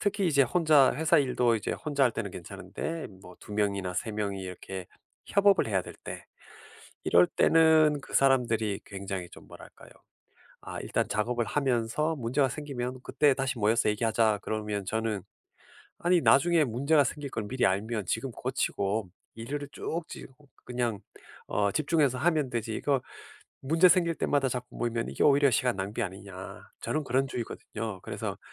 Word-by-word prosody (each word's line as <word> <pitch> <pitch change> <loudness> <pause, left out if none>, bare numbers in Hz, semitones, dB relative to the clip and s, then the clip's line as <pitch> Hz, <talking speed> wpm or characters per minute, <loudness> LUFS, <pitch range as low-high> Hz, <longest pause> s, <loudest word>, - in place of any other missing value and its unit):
특히 205 -1 0
이제 145 -4 +4
혼자 150 -1 +4
회사 155 +3 +3
일도 125 -4 +2
이제 105 - -3
혼자 145 -3 -1
할 125 - +4
때는 100 -3 -4
괜찮은데 160 - -6 0.2
뭐 90 -2 -13
2 - - -11
명이나 100 -3 -1
3 110 - -2
명이 100 -2 -3
이렇게 95 0 -7 0.4
협업을 200 -1 +4
해야 95 -3 +1
될 - - -10
때 - - -7 0.8
이럴 90 +1 +5
때는 160 - +4
그 - - -11
사람들이 115 -6 +2
굉장히 95 -2 -5
좀 - - -14
뭐랄까요. - - -14 0.7
아 - - -6
"일단 - - -1
작업을 120 +2 0
하면서 135 +5 0
문제가 130 +1 +1
생기면 130 -3 -5
그때 145 -2 +3
다시 130 -3 -2
모여서 110 +1 +2
얘기하자." 110 0 +1
그러면 105 -2 -3
저는 110 -1 -2 0.8
"아니 175 +1 +3
나중에 160 +3 +4
문제가 140 +5 +3
생길 145 +2 -4
걸 110 - -3
미리 130 +3 0
알면 105 +2 0
지금 120 +7 -2
고치고 110 -5 -2 0.3
일을 140 +5 -5
쭉 170 - -3
지 - - -8 0.4
그냥 120 -4 -2 0.5
어 100 -1 +1
집중해서 150 -3 +1
하면 155 -1 +1
되지 115 -2 -3
이거 140 -3 0 0.6
문제 165 +6 +5
생길 170 0 +3
때마다 140 -3 +1
자꾸 125 0 -4
모이면 115 -1 -2
이게 - - -1
오히려 140 0 +5
시간 125 +1 +1
낭비 100 +2 -2
아니냐." 95 -1 -8
저는 155 - -1
그런 135 +2 +1
주의거든요. 115 -4 -5
그래서 - - -5
125 Hz, 330 characters per minute, -28 LUFS, 105-145 Hz, 0.8 s, 이럴